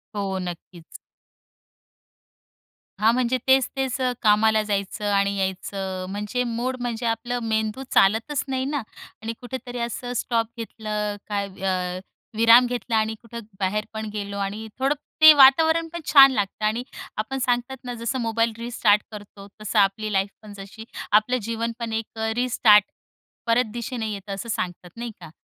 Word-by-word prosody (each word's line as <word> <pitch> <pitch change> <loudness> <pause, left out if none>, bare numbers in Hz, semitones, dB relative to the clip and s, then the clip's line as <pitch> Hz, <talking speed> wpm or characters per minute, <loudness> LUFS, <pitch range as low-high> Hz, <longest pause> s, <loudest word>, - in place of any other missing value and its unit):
हो, 195 -2 -2
नक्कीच. 175 -1 -8 2.0
हां, 220 +2 +5
म्हणजे 255 0 +1
तेच-तेच 265 0 +2
अ, 255 -1 +2
कामाला 220 0 +4
जायचं 200 +1 -2
आणि 200 0 +2
यायचं 190 0 -3
म्हणजे 210 +5 -2
मूड, 240 +2 -2
म्हणजे 235 -1 -3
आपलं 240 +2 -1
मेंदू 220 +2 -1
चालतच 225 +8 +3
नाही 260 -1 -1
ना. 285 -1 -2 0.4
आणि 225 +1 -4
कुठेतरी 245 0 -6
असं 245 +1 -4
स्टॉप 230 -2 0
घेतलं 215 -2 -4
काय, 200 -1 -2
अ, 185 -1 -2 0.4
विराम 230 +2 +7
घेतला 245 -2 -3
आणि 220 0 +1
कुठं 235 0 -9 0.2
बाहेर 205 +2 -1
पण 220 0 -4
गेलो. 200 -1 -4
आणि 205 +3 -4
थोडं 275 +3 +2 0.3
ते 315 0 +12
वातावरण 320 +4 +6
पण 340 - -4
छान 275 -2 +9
लागतं. 205 -2 -2
आणि 220 +3 0 0.3
आपण 215 +5 -3
सांगतात 245 +2 -1
ना, 250 -1 -5
जसं 235 +2 -3
मोबाईल 230 0 0
रिस्टार्ट 230 -3 +2
करतो. 205 -1 -11
तसं 215 +1 0
आपली 205 +2 +1
लाईफ 195 +1 +1
पण, 210 -2 -11
जशी 200 +3 -10 0.3
आपलं 215 +4 +4
जीवन 230 0 -2
पण 230 -1 -4
एक 225 0 -4
अ, 220 0 0
रिस्टार्ट 230 -4 +5 0.6
परत 230 -1 +2
दिशेने 235 -1 -4
येतं, 200 0 -6
असं 200 +4 -7
सांगतात 180 -3 -4
नाही 235 0 -5
का? 170 -3 -11
220 Hz, 155 wpm, -24 LUFS, 205-245 Hz, 2.0 s, ते